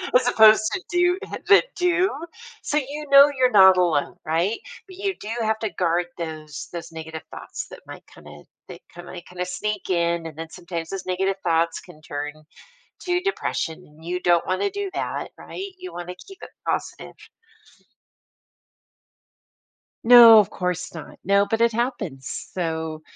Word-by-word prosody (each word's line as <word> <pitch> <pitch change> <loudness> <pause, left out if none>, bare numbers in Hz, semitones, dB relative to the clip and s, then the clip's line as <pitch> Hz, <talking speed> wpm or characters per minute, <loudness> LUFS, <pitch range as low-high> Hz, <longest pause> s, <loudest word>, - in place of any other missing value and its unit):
as 250 0 +4
opposed 220 -2 +6
to 385 - -3
do 355 +1 +2 0.3
that 400 - +7
do. 360 +1 +2 0.5
So 295 - -1
you 295 +2 -3
know 280 +1 +8
you're 255 -1 +3
not 190 -3 +7
alone, 165 -5 +1
right? 170 +8 0 0.3
But 370 - -13
you 390 0 -1
do 210 - -8
have 220 0 0
to 220 -2 -2
guard 175 0 +1
those 155 -3 -7
those 170 -1 -7
negative 160 -1 -8
thoughts - - -7
that - - -12
might - - -10
kinda - - -14 0.2
they - - -11
kinda 175 +1 -7
sneak 210 +2 -4
in, 170 -1 0
and 155 - -11
then 165 0 -7
sometimes 170 -2 -6
those 195 -1 -5
negative 190 +1 -1
thoughts 165 -1 +1
can 170 -4 -16
turn 145 0 -5 0.7
to 355 -1 0
depression 370 - -2
and 155 +2 -19
you 180 +1 -2
don't 175 -1 +3
wanna 185 - 0
do 405 0 -4
that, - - -3
right? 390 +1 -8
You 365 0 -8
want 175 0 -7
to 180 - -6
keep 390 -1 -13
it - - -9 0.2
positive. - - -3 2.9
No, 230 -2 +10
of 205 - +2
course 180 -1 -3
not. 160 -3 -10
No, 200 +2 +3
but 225 +1 0
it 235 - +4
happens, 215 - -4
so, 160 -3 -3
185 Hz, 160 wpm, -23 LUFS, 165-250 Hz, 2.9 s, No